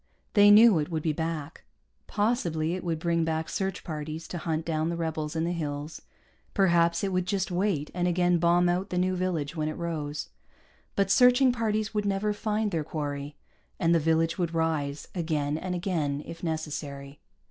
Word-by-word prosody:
They 205 -2 +7
knew 210 -3 +8
it 150 - -2
would 160 -3 -2
be 155 - +1
back. 160 -1 -4 0.4
Possibly 175 -8 0
it 185 - -4
would 165 -2 -1
bring 170 0 0
back 160 0 -1
search 190 -1 -3
parties 155 0 -5
to 175 - -4
hunt 160 0 -2
down 160 -1 0
the 170 - -2
rebels 160 -2 -3
in 160 - 0
the 170 - 0
hills; 150 -2 -4 0.5
perhaps 170 -3 +3
it 195 -1 -1
would 185 0 0
just 195 -1 -1
wait 180 -5 0
and 180 0 0
again 175 0 +2
bomb 175 +1 +4
out 180 +3 0
the 180 - -2
new 185 +1 +1
village 175 -5 -2
when 155 -1 -1
it 155 - -5
rose. 155 -4 -4 0.7
But 195 -1 +1
searching 250 +2 +6
parties 215 -2 -1
would 210 -1 -1
never 200 +2 0
find 210 0 -1
their 160 -4 -1
quarry, 145 -2 -4 0.4
and 170 -1 +3
the 170 - +4
village 165 +2 +1
would 170 -2 -1
rise 155 -3 -1
again 155 -4 -1
and 180 +3 -3
again, 155 -6 -1
if 165 - -9
necessary. 145 -4 -5
170 Hz, 185 wpm, -28 LUFS, 155-185 Hz, 0.7 s, knew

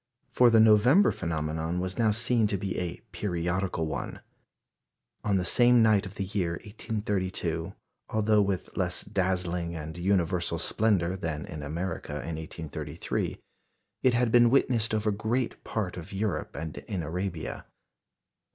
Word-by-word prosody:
For 125 -1 +6
the 115 -1 +5
November 110 - +6
phenomenon 80 +1 -2
was 95 +2 -3
now 115 -2 +4
seen 115 +1 +2
to 100 - -1
be 95 0 -3
a 90 -2 -4
periodical 90 -2 -1
one. 80 -2 -4 1.0
On 100 -2 +2
the 90 - -1
same 120 +4 +5
night 105 -3 +4
of 95 - -12
the 100 - -2
year 95 -4 -1
1832, 105 -1 -3 0.3
although 110 -1 +3
with 100 -2 -2
less - - 0
dazzling 90 -2 -1
and 80 0 -6
universal 90 -2 +1
splendour 95 -3 +1
than 80 -5 -4
in 80 -6 -7
America 80 +1 -4
in 80 +2 -4
1833, 80 -1 -4 0.6
it 130 -2 +3
had 120 -1 +2
been 120 0 +6
witnessed 115 -4 +2
over 105 0 +1
great 110 +5 -2
part 105 -6 -3
of 90 +2 -8
Europe 95 -4 -2
and 80 +2 -5
in 95 -6 -4
Arabia. 85 -5 -4
95 Hz, 140 wpm, -28 LUFS, 85-110 Hz, 1.0 s, For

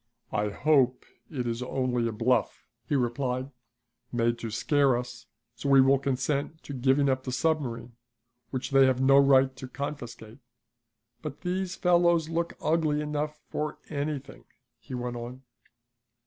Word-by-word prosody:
"I 105 0 0
hope 130 +1 +2 0.2
it 130 -6 -3
is 115 0 -2
only 125 -2 0
a - - -1
bluff," 115 +2 0 0.2
he 145 - +2
replied, 130 +1 -1 0.6
"made 120 -1 +1
to 115 - -4
scare 135 +3 +2
us 125 0 -7 0.3
so 125 +4 -4
we 135 -1 +7
will 135 +1 +5
consent 140 +4 -2
to 140 - -7
giving 135 +2 +2
up 130 -1 +1
the 130 - -4
submarine, 125 -4 -1 0.6
which 130 +1 -4
they 135 -1 +6
have 130 -1 +1
no 135 +1 +6
right 135 -1 +5
to 130 - -7
confiscate. 125 -4 -7 0.8
But 150 -3 -7
these 185 +1 -2
fellows 170 -2 +3
look 170 +1 -1
ugly 155 -2 +1
enough 150 0 -3
for 150 0 -3
anything," 140 -2 -4 0.3
he 130 - -8
went 120 0 -4
on. 125 +2 -8
135 Hz, 150 wpm, -28 LUFS, 125-150 Hz, 0.8 s, we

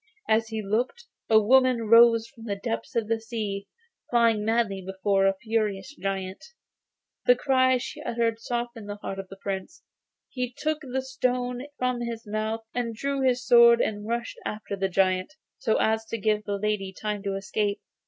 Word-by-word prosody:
As 220 +1 +3
he 220 -1 -4
looked 245 - -1 0.2
a 220 -1 +7
woman 255 +2 +4
rose 230 0 +7
from 230 -3 -14
the 205 -3 -2
depths 115 -12 -4
of 230 -2 0
the 225 0 0
sea, 210 -3 -4 0.4
flying 230 -3 +3
madly 220 -3 0
before 195 +1 +1
a 195 - +2
furious 215 +1 -1
giant. 195 -4 -4 0.8
The - - +8
cries 260 - +3
she - - -7
uttered 230 -1 -1
softened 235 -2 -4
the 205 - -3
heart 195 -1 -6
of 195 - -6
the 195 - -11
Prince; 195 -1 -5 0.4
he 250 -1 -4
took 310 0 -1
the 265 -2 -3
stone 250 0 -2
from 250 -1 -1
his 235 -1 -5
mouth, 215 +1 -2
and 235 -2 -2
drawing 275 +3 -1
his 245 0 -1
sword 235 -1 +7
he - - +2
rushed 230 +3 -4
after 210 -1 -4
the 195 0 -1
giant, 185 +7 +1 0.2
so 220 - +1
as 220 0 +1
to 230 - -4
give 210 0 0
the 205 -1 -1
lady 205 -2 -1
time 210 -1 -2
to 195 -1 -2
escape. 205 +1 -1
225 Hz, 175 wpm, -26 LUFS, 200-240 Hz, 0.8 s, The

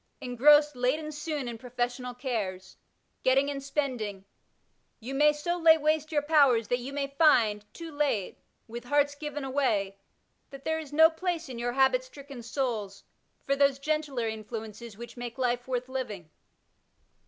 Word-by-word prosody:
Engrossed 295 +4 +4
late 250 +3 +1
and 305 -1 -6
soon 295 -3 -4
in 235 -1 -6
professional 245 +1 -3
cares, 210 -8 -4 0.5
getting 270 +2 +3
and 275 -1 -5
spending, 250 -9 -3 0.7
you 245 +4 -6
may 295 +2 +5
so 345 +4 -3
lay 325 -1 +7
waste 310 0 0
your 295 -2 +1
powers 280 -7 +4
that 245 - +1
you 255 +3 -6
may 280 0 -2
find, 235 -8 +3
too 330 -1 -9
late, 285 -10 -1 0.3
with 235 +1 -8
hearts 285 +2 +2
given 295 0 -6
away, 220 -8 0 0.5
that 275 0 -12
there 320 0 0
is 305 -3 -9
no 320 +2 +7
place 340 -1 -3
in 245 -2 -6
your 240 0 -2
habit^stricken 280 - 0
souls 225 -6 -3 0.4
for 275 - +1
those 280 -1 +3
gentler 285 -4 -1
influences 220 0 -7
which 235 +2 -10
make 240 -1 -6
life 245 -1 -1
worth 250 -1 -2
living. 215 -11 -5
265 Hz, 155 wpm, -28 LUFS, 235-295 Hz, 0.7 s, lay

